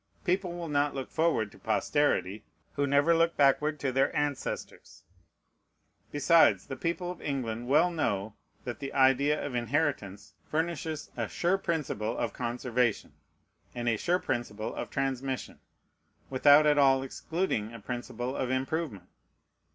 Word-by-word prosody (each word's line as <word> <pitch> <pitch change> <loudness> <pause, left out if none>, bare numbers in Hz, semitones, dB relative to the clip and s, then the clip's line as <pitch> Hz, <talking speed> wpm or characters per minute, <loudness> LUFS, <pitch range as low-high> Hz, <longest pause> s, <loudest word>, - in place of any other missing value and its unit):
People 180 -1 0
will 170 -1 -5
not 145 -1 0
look 135 -2 -5
forward 160 -11 +1
to - - -17
posterity, 110 -8 0 0.3
who 140 0 0
never 140 +4 +4
look 165 0 +2
backward 150 +2 +3
to 135 -2 -1
their 135 +2 +2
ancestors. 145 -2 -4 1.1
Besides, 145 - +4
the 135 - -6
people 170 +4 -2
of 180 - -10
England 120 -4 -3
well 150 +6 +4
know 110 - -1 0.3
that 120 - -5
the 135 -1 -5
idea 140 +2 +3
of 140 - -5
inheritance 120 -6 -2
furnishes 160 -1 -3
a 115 -2 -2
sure 180 - 0
principle 145 - -2
of 120 - -2
conservation, 120 -1 -1 0.6
and 120 -1 -3
a 115 - +3
sure 175 - +1
principle 120 - -3
of - - -5
transmission, 135 -1 -3 0.7
without 145 +3 +6
at 150 -1 +4
all 135 -1 +4
excluding 135 - -2
a 115 - -9
principle 120 +3 -5
of 130 - -2
improvement. 130 - -2
135 Hz, 140 wpm, -29 LUFS, 120-155 Hz, 1.1 s, without